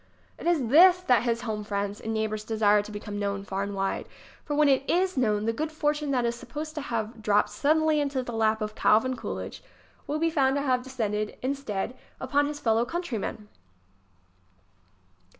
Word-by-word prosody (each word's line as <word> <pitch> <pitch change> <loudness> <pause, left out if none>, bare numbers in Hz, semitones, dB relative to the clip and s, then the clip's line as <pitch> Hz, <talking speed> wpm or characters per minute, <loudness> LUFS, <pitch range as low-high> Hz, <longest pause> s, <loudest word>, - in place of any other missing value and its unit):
It - - -5
is 305 -9 +2
this 355 +6 +8
that 250 - +3
his 235 0 -1
home 215 -2 -3
friends 200 0 -3
and 225 - -4
neighbors 215 -1 -2
de 220 0 -4
sire 210 -1 +5
to 210 - -10
become 205 0 -6
known 200 -1 -2
far 195 -1 -3
and 200 0 -3
wide. 195 0 -2 0.4
For, 295 - -3
when 300 0 +4
it 270 -1 +4
is 370 +2 +2
known, 215 -5 +1
the 230 - +1
good 310 +6 -3
fortune 300 -1 -1
that 250 -3 +1
is 235 - +1
supposed 300 +6 -7
to 305 - -4
have 225 -3 -4
dropped 210 -1 +2
suddenly 310 +1 +2
into 280 -3 -1
the 240 - -6
lap 220 0 +1
of 210 0 -4
Calvin 225 +5 +3
Coolidge - - -6 0.5
will 295 - -1
be 330 +1 +1
found 270 -4 +2
to 280 - 0
have 255 -3 +1
descended, 215 -5 -3
instead, 255 -5 -2 0.2
upon 285 +3 +1
his 295 0 -5
fellow 225 -3 +2
countrymen 240 - -4
240 Hz, 190 wpm, -27 LUFS, 215-290 Hz, 0.5 s, this